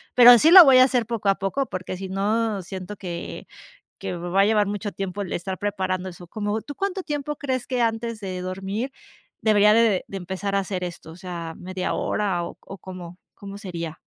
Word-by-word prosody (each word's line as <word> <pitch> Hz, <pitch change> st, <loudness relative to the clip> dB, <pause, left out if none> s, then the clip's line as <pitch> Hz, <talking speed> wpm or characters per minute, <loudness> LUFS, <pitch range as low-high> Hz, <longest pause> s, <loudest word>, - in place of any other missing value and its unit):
pero 245 Hz, -1 st, +10 dB
sí 310 Hz, +7 st, +5 dB
lo 370 Hz, 0 st, +12 dB
voy 265 Hz, -2 st, +7 dB
a 255 Hz, -, +9 dB
hacer 250 Hz, -3 st, +1 dB
poco 230 Hz, -3 st, -3 dB
a 195 Hz, -, +4 dB
poco, 195 Hz, +9 st, -1 dB
porque 185 Hz, -4 st, -6 dB
si 190 Hz, +1 st, -6 dB
no 210 Hz, +2 st, 0 dB
siento 185 Hz, +2 st, -7 dB
que 175 Hz, -3 st, -7 dB, 0.5 s
que -, -, -4 dB
va 175 Hz, +3 st, +1 dB
a -, -, +5 dB
llevar 210 Hz, -1 st, +3 dB
mucho 205 Hz, +1 st, -3 dB
tiempo 195 Hz, 0 st, -5 dB
el 190 Hz, -, -5 dB
estar 185 Hz, +2 st, -4 dB
preparando 190 Hz, -2 st, -2 dB
eso 175 Hz, 0 st, -12 dB
como, 205 Hz, +3 st, -2 dB
¿tú 290 Hz, -, -9 dB
cuánto 390 Hz, +1 st, -2 dB
tiempo 295 Hz, -2 st, -4 dB
crees 260 Hz, -4 st, -3 dB
que 250 Hz, -2 st, -1 dB
antes 230 Hz, 0 st, -1 dB
de 185 Hz, -3 st, -5 dB
dormir 195 Hz, +7 st, -4 dB, 0.5 s
debería 210 Hz, -1 st, +5 dB
de 225 Hz, -4 st, +3 dB
de 195 Hz, -, -6 dB
empezar 190 Hz, +2 st, -4 dB
a -, -, +3 dB
hacer 190 Hz, -1 st, -3 dB
esto? 170 Hz, -2 st, -7 dB
O -, -, -11 dB
sea, 170 Hz, -3 st, -6 dB
¿media 185 Hz, 0 st, -3 dB
hora 190 Hz, -5 st, -1 dB
o 170 Hz, -, -8 dB
o 195 Hz, -, -10 dB
cómo 180 Hz, -2 st, -10 dB, 0.2 s
cómo 200 Hz, 0 st, -9 dB
sería? 170 Hz, -6 st, -6 dB
195 Hz, 210 wpm, -24 LUFS, 185-225 Hz, 0.5 s, lo